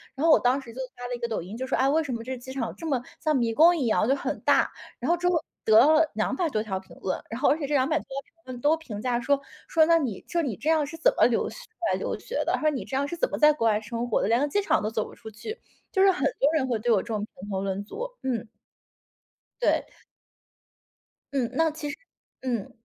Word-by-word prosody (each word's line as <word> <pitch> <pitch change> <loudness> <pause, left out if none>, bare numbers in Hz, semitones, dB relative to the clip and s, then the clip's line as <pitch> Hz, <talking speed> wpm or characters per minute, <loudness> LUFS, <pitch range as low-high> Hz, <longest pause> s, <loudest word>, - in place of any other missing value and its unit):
然 285 - -1
后 330 - +6
我 - - +7
当 255 +3 +2
时 235 -3 -11
就 260 - -9 0.2
发 245 0 -8
了 245 - -4
一 - - -8
个 235 - -2
抖 220 - -2
音， 195 +7 -8
就 260 +1 -4
说： - - +1
“哎， 270 +1 +3
为 315 +3 +3
什 265 -4 -4
么 230 - -5
这 260 +1 -4
机 260 +2 -9
场 235 -4 -3
这 330 - -6
么 265 -5 +1 0.2
像 310 -2 +1
迷 230 -3 +1
宫 335 +7 +6
一 265 - 0
样， 215 0 +2
就 270 - +3
很 - - -3
大。” - - +3 0.3
然 - - -2
后 345 - +3
之 355 +1 0
后 335 -3 +1 0.2
得 220 0 +6
了 310 +4 +5
200 270 +10 0
多 215 -5 0
条 190 -3 -3
评 190 - -16
论， 185 - -2
然 230 +2 -5
后 - - +5
而 295 - +3
且 285 - -3
这 295 - -2
200 280 +3 +2
多 - - -11
条 275 +1 -5
评 - - -33 0.2
论 245 - -9
都 310 +2 +3
评 215 -10 -7
价 245 -1 0
说， 280 +3 +1 0.3
说： 320 -2 +4
“那 335 0 +5
你” 250 - -3
说： 345 - 0
“你 255 -10 -2
这 290 +7 -2
样 315 -2 +3
是 325 - -8
怎 320 - +4
么 - - +6
留 235 -1 +1
学 - - -11
出 - - -30 0.2
来 - - +1
留 - - -2
学 - - -3
的？ - - +1
“他 - - -5
说：” 310 - +4
你 265 - -4
这 265 - -5
样 280 - +1
是 345 - -4
怎 - - +1
么 - - -3
在 300 0 +7
国 230 -6 0
外 210 -1 +3
生 230 +3 -4
活 - - +2
的， - - +1
连 235 +2 +4
个 290 - +2
机 410 +8 +1
场 395 - +2
都 215 - -1
走 220 -1 -1
不 - - -12
出 220 - -10
去？ 430 - -7 0.3
“就 380 - +2
是 390 - +7
很 365 - -3 0.2
多 285 +3 +4
人 265 -4 +1
会 230 -3 0
对 240 +2 -2
我 205 -4 +4
这 - - -15
种 220 -2 -2
评 205 -1 -8
头 190 -1 -2
论 195 +1 -2
足。 470 - -5 0.2
嗯。 240 -4 -2 1.1
对。 - - +2 1.5
嗯， 250 -4 0
那 325 0 +3
其 300 -1 -5
实 280 - -6 0.4
嗯， 240 -6 -2
260 Hz, 300 characters per minute, -26 LUFS, 230-310 Hz, 1.5 s, 我